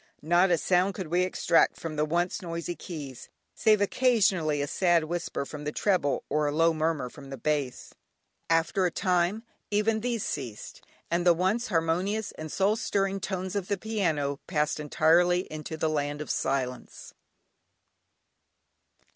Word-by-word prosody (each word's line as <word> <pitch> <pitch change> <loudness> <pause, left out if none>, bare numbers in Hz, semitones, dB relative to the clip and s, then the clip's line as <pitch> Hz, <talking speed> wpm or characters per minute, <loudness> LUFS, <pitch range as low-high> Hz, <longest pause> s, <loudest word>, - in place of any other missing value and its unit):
Not 175 +4 +4
a 175 - +3
sound 180 +4 +2
could 185 -6 -5
we 175 +2 +2
extract 175 -2 +2
from 160 -2 -5
the 150 0 +1
once 175 +6 -1
noisy 170 -1 -4
keys, 145 -9 -8 0.2
save 215 -2 +3
occasionally 200 - +2
a 145 - 0
sad 175 +2 +2
whisper 170 -3 -3
from 150 +1 -8
the 150 - -2
treble, 180 -6 +1
or 150 0 +1
a - - 0
low 165 +2 +3
murmur 155 -4 -1
from 135 +2 -12
the 135 - -6
bass. 145 -1 -2 0.6
After 165 +3 +2
a - - -3
time, 180 +4 +1 0.3
even 210 +1 +1
these 235 -1 -2
ceased, 120 -7 -6 0.3
and 170 +1 +1
the 175 -1 +5
once 190 +7 0
harmonious 185 +4 0
and 155 -1 -8
soul 200 +2 +2
stirring 195 -2 0
tones 190 0 -4
of 195 -2 -2
the 200 - 0
piano, 165 -10 -1
passed 150 -2 0
entirely 170 +4 +3
into 155 +1 -6
the 160 - 0
Land 145 -1 -1
of 150 - -4
Silence. 130 -2 -3
170 Hz, 155 wpm, -28 LUFS, 150-190 Hz, 0.6 s, the